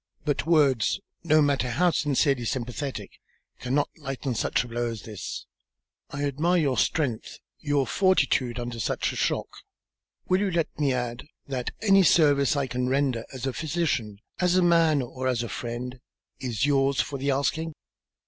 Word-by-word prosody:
But 145 0 -1
words, 145 - +3 0.2
no 155 -2 +4
matter 140 -3 +1
how 175 +9 +2
sincerely 140 -4 +1
sympathetic, 130 +3 -4 0.5
cannot 130 +4 0
lighten 135 -3 -4
such 115 - 0
a - - -9
blow 120 0 -2
as 115 -2 -7
this. 105 -4 -6 0.6
I 140 0 -4
admire 155 +6 +1
your 140 -6 +1
strength, 120 +2 -1 0.2
your 145 -2 +1
fortitude, 130 - +2
under 120 -1 -5
such - - -1
a - - -7
shock. - - 0 0.8
Will 185 0 +3
you 205 - +1
let 165 -3 0
me 145 -2 +2
add 125 +1 -3 0.2
that 130 -3 -3
any 195 -2 +6
service 145 -6 +4
I 140 -1 +1
can 125 0 -2
render 130 -4 0
as 130 -2 -8
physician, 140 -9 -1 0.2
as 180 0 +3
man, 165 -5 +4
or 130 +1 -4
as 120 -2 0
friend, 120 +2 -5 0.4
is 120 -2 -1
yours 135 -2 +2
for 140 +2 -1
the 140 +2 -1
asking?" 150 +4 0
135 Hz, 155 wpm, -26 LUFS, 125-155 Hz, 0.8 s, any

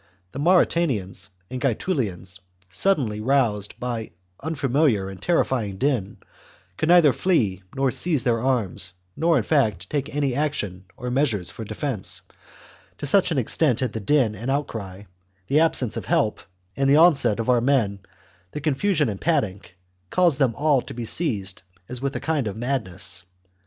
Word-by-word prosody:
The 135 - -7
Mauritanians 145 - +1 0.2
and 130 0 -4
Gaetulians, 105 - -2 0.3
suddenly 120 - +1
roused 110 -5 0
byan 120 -3 -4 0.3
unfamiliar 135 -8 +1
and 95 - -11
terrifyingdin, 125 - 0 0.6
could 155 - -1
neither 170 -6 +6
flee 110 - +1
nor 135 -1 +1
seize 140 0 0
their 115 -2 +1
arms, 105 -9 0 0.2
nor, 165 +1 +3
in 120 - +1
fact, 105 - 0
take 145 0 -1
any 140 -3 +1
action 105 -11 -2
or 125 0 -4
measures 115 -10 +1
for 115 - -7
defence, 110 +1 -2 0.7
to - - -5
such 185 +7 +4
an 160 - -1
extent 130 +1 +1
had 130 -4 -1
the 110 - -3
din 120 0 +2
and 115 +5 -5
outcry, 110 -9 -3 0.4
the 140 +7 +2
absence 145 -8 +2
of - - -4
help, - - +1 0.3
and 135 0 +1
the 140 - +6
onset 140 -10 +5
of 115 - -2
our 125 -2 +4
men, 115 -7 +1 0.5
the - - -3
confusion 150 +2 +1
and 100 -3 -4
panic, 100 - -1 0.3
caused 175 -6 +2
them 130 -5 +2
all 145 -3 +2
to - - -9
be 120 -1 -4
seized 105 - -1 0.3
as 125 0 -4
with 140 0 -2
a - - -1
kind 155 -7 -1
of 100 - -5
madness. 110 -8 -2
130 Hz, 155 wpm, -24 LUFS, 105-145 Hz, 0.7 s, neither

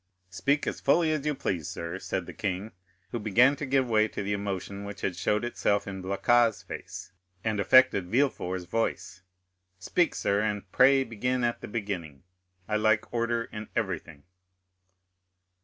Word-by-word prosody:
"Speak 140 +10 +1
as - - -3
fully 165 -2 +3
as 150 -1 -1
you 150 - +1
please, 85 - -2
sir," 85 0 -5
said - - -3
the - - -9
king, 100 +2 -3 0.4
who 120 - -2
began 120 +6 +4
to 145 - -4
give 130 -1 +2
way 110 -2 +3
to 105 - -5
the 100 +1 -1
emotion 100 0 -4
which 100 -1 -8
had 90 - -1
showed 105 +5 0
itself 100 -4 0
in 95 -1 -6
Blacas's 110 +4 +2
face 95 - -8 0.3
and 110 -2 -1
affected 130 -3 +5
Villefort's 95 -8 0
voice. 95 -2 -2 0.6
"Speak, 160 - +1
sir, 100 +1 +1
and 105 -3 -3
pray 135 +1 +5
begin 125 +2 -2
at 120 0 0
the - - -6
beginning; 95 -10 -5 0.4
I 105 - +1
like 110 0 +1
order 115 0 0
in 105 -2 -8
everything." 75 -3 -3
105 Hz, 160 wpm, -28 LUFS, 95-120 Hz, 0.6 s, affected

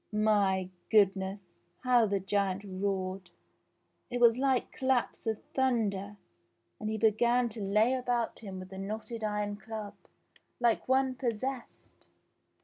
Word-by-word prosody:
My 200 -3 +2 0.2
goodness! 195 -2 +3 0.4
How 245 -3 +4
the 200 -1 0
j 190 - -14
giant 195 -1 0
roared! 190 -1 -3 0.8
It 245 0 -2
was 235 0 +5
like 265 -2 +1
claps 260 -3 0
of 220 -1 -2
thunder, 210 -6 0 0.6
and 215 - -3
he 220 - -1
began 235 +3 +3
to 220 0 -8
lay 210 +5 +3
about 245 -2 -1
him 195 -4 -7
with 185 0 -8
the 190 0 -8
knotted 220 +3 -5
iron 210 -1 -1
club, 215 0 -7 0.7
like 235 -2 +2
one 260 0 +3
pos 245 -2 -1
sessed. 265 -2 -7
215 Hz, 140 wpm, -31 LUFS, 195-240 Hz, 0.8 s, was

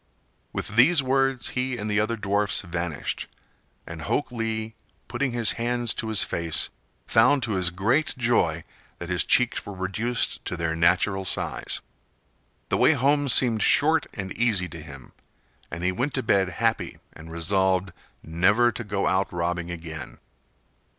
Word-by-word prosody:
With - - -4
these 135 +8 +5
words 135 -1 0
he 125 0 -2
and 105 - -4
the 105 0 +1
other 110 +2 0
dwarfs 100 0 0
vanished, 85 -4 -3 0.6
and 85 -1 -8
Hok 125 - -1
Lee, 110 -2 -3 0.3
putting 140 -2 -2
his 120 -3 +3
hands 120 -1 +1
to 110 - -3
his 110 -3 +2
face, 85 -1 -1 0.3
found 130 +4 +4
to 115 - -2
his 95 -3 +3
great 120 - 0
joy 100 -10 +1 0.3
that 85 - -7
his 90 - +2
cheeks 125 -1 +2
were 100 - -8
reduced 105 +6 -2
to 90 - -3
their 80 -1 -1
natural 90 +4 +2
size. 95 - -1 0.9
The - - +1
way - - +5
home 145 +1 +2
seemed 120 -3 +5
short 155 +2 +3
and 95 -2 -5
easy 105 -6 +1
to - - -9
him, - - -12 0.6
and 85 +2 -6
he 90 - +2
went 125 +10 -2
to 130 - 0
bed 95 -4 +2
happy 115 +4 -1 0.2
and 80 +1 -12
resolved 95 +2 0 0.3
never 100 +9 +3
to 120 - -6
go 100 -2 -2
out 95 +1 +1
robbing 85 0 -2
again. 80 -2 -7
105 Hz, 155 wpm, -25 LUFS, 90-120 Hz, 0.9 s, these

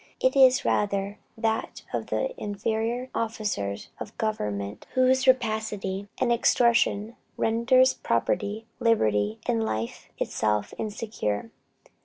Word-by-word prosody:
It 260 +1 +2
is 265 0 +6
rather 200 0 0 0.2
that 225 0 -2
of - - -2
the - - -1
inferior 225 - -2
officers 210 - -2
of 210 - -8
government 105 - -3
whose 260 +1 +3
rapacity 215 -5 +1
and 240 - +2
extortion 235 -2 +3 0.2
renders 245 +3 +4
property, 200 - -1
liberty, 110 - +2
and 115 -1 +1
life 110 +1 -4
itself 105 -1 -1
insecure. 205 - -3
215 Hz, 105 wpm, -26 LUFS, -, 0.2 s, is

